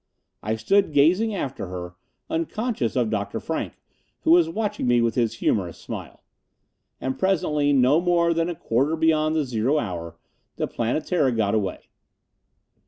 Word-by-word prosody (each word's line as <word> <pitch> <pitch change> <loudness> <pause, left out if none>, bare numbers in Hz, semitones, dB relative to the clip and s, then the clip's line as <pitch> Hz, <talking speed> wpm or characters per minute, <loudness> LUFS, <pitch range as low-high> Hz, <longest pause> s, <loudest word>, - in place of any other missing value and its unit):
I 110 +2 -1
stood 160 - +2
gazing 180 +10 +3
after 135 - -4
her, 90 -1 -6 0.3
unconscious 165 - -2
of 120 -4 +1
Dr. 100 -2 -2
Frank, - - -3 0.5
who - - +2
was 170 -1 +6
watching 210 - -2
me 120 0 +4
with 115 -1 +1
his 115 -2 0
humorous 90 -7 -1
smile. - - -8 0.8
And 130 0 -3
presently, 150 -6 +1
no 140 +4 +4
more 170 -1 +2
than 165 +1 0
a 175 - -3
quarter 140 +3 0
beyond 160 -1 +2
the 155 -2 +1
zero 125 +4 0
hour, 85 - -4 0.4
the - - -2
Planetara 135 +4 0
got 110 -3 +1
away. 100 -4 -2
140 Hz, 150 wpm, -24 LUFS, 115-165 Hz, 0.8 s, was